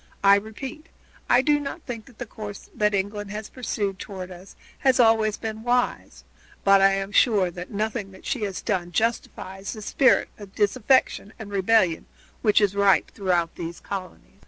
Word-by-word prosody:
I 200 0 +7
repeat, 220 +9 -3 0.4
I 250 +1 +5
do 295 0 +3
not 290 +3 -6
think 230 -2 -7
that 245 -5 -18
the 245 - -5
course 210 -2 -9
that 210 -1 +1
England 205 +1 -3
has 210 +1 -6
pursued 205 -6 -3
toward 185 -2 -7
us 180 +2 -12 0.2
has 265 -2 +3
been 245 - +6
always 220 -1 +2
wise, 225 +3 -2 0.4
but 195 0 +6
I 195 0 +5
am 195 +1 -2
sure 200 -5 +3
that 180 +1 -8
nothing 210 -1 -3
that 190 - -15
she 260 - -2
has 200 -3 -3
done 180 -5 -1
justifies 200 -3 -2
the 215 - -8
spirit 260 +4 +3
of 200 -2 -12
disaffection 220 0 +2
and 215 -2 -9
rebellion 195 -3 +2 0.3
which 215 -2 +4
is 200 -1 +2
ripe 200 -1 +3
throughout 175 -4 0
these 170 0 -6
colonies." 185 - -8
205 Hz, 175 wpm, -24 LUFS, 195-225 Hz, 0.4 s, I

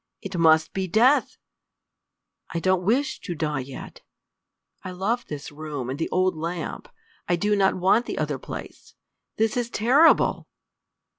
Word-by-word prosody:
It 195 -1 -7
must 160 -2 +4
be 190 -1 -2
death! 240 - +3 1.1
I 170 - -3
don't 185 +1 +2
wish 265 +10 0
to 175 - -6
die 150 -3 -2
yet. 130 0 -9 0.8
I - - -6
love 200 +7 -2
this 150 -1 -7
room 145 -4 -5
and 135 - -5
the 165 - -2
old 185 -1 +1
lamp. 165 +1 -5 0.4
I 175 - +4
do 205 +4 +1
not 195 -1 +3
want 190 +6 +2
the - - -4
other - - -2
place! - - -9 0.4
This 220 0 +1
is 240 -1 -1
terrible!" 260 +10 +3
185 Hz, 150 wpm, -24 LUFS, 160-220 Hz, 1.1 s, must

